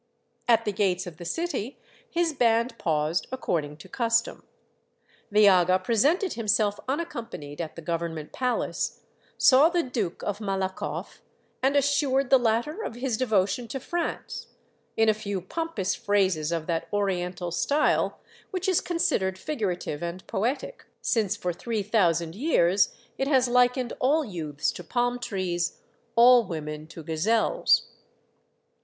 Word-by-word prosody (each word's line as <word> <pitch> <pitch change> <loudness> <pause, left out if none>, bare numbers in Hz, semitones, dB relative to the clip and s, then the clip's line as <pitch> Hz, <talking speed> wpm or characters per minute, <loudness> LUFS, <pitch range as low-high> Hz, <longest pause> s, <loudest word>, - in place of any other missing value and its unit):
At 230 -1 +4
the 210 - +1
gates 190 -2 0
of 170 -3 -9
the 175 - -9
city 280 - -3 0.3
his 335 -1 0
band 235 -2 +2
paused 155 +2 0
according 155 - -2
to 160 - -13
custom. 230 -1 0 0.9
The 210 0 +5
aga 185 -1 +5
presented 275 - +1
himself 210 -2 +1
unaccompanied 235 - -4
at 160 - -6
the 165 - -9
Government 165 -2 -3
Palace, 250 -1 -1 0.4
saw 275 +5 +6
the 345 -1 +1
Duke 220 - -3
of 205 0 -2
Malakoff, 190 -2 -3 0.4
and 270 +2 +2
assured 275 -2 +2
the 265 - +7
latter 240 - 0
of 230 - -5
his 245 -1 -1
devotion 215 -1 +1
to 270 - -4
France, 345 +6 -4 0.5
in 225 - +4
a 215 - +5
few 205 -2 -4
pompous 205 - -2
phrases 185 -6 +1
of 165 -2 -2
that 165 -1 -2
Oriental 180 -3 -1
style 285 - +1 0.3
which 370 0 -3
is 370 -3 +3
considered 190 - 0
figurative 185 - -3
and 170 +2 -5
poetic, 275 - -2 0.2
since 215 -5 +1
for 180 -1 -3
three 220 +3 -3
thousand 170 -6 +1
years 195 - +3 0.3
it 270 - 0
has 260 -3 +3
hkened 250 0 +2
all 295 +4 +2
youths 155 - -2
to 180 - -9
palm 245 +5 0
trees, 185 -7 -2 0.4
all 245 +1 +7
women 155 -4 -6
to 165 0 -10
gazelles. 215 - +2
215 Hz, 140 wpm, -26 LUFS, 175-255 Hz, 0.9 s, the